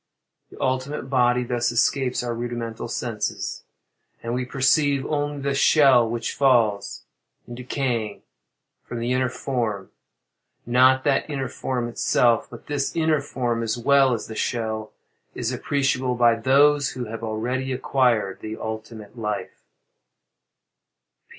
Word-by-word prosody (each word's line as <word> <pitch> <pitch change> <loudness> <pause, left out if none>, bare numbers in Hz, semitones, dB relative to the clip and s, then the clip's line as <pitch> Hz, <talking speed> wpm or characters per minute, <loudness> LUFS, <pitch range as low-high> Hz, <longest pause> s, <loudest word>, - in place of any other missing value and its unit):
The - - -14
ultimate 130 +1 -2
body 125 -1 +3
thus 120 -1 0
escapes 125 +2 +1
our 120 -1 -2
rudimental 115 -1 -4
senses, - - -4 0.6
and 115 0 -3
we 125 +1 -1
perceive 140 +1 +2
only 145 -1 -2
the 140 0 0
shell 135 -4 +5
which 120 0 -3
falls, 115 -7 +2 0.4
in 120 - -8
decaying, 120 -4 -3 0.6
from 120 - -6
the 120 +1 -2
inner 130 0 +1
form; 120 -6 -3 0.7
not 130 +2 +4
that 145 +1 +1
inner 135 -3 -2
form 125 -1 -3
itself; 120 0 +2
but 115 -3 -12
this 145 0 -2
inner 160 -3 +2
form, 120 -4 -2
as 115 0 -1
well 135 +2 +4
as 115 - -6
the 110 - -8
shell, 110 -1 -2 0.4
is - - -2
appreciable 135 -3 0
by 120 -1 +5
those 140 +2 +3
who 125 -1 -4
have 115 +1 -7
already 125 +4 -2
acquired 125 -6 +1
the 110 0 -6
ultimate 110 0 -7
life. 105 -2 -4
125 Hz, 130 wpm, -23 LUFS, 115-135 Hz, 0.7 s, shell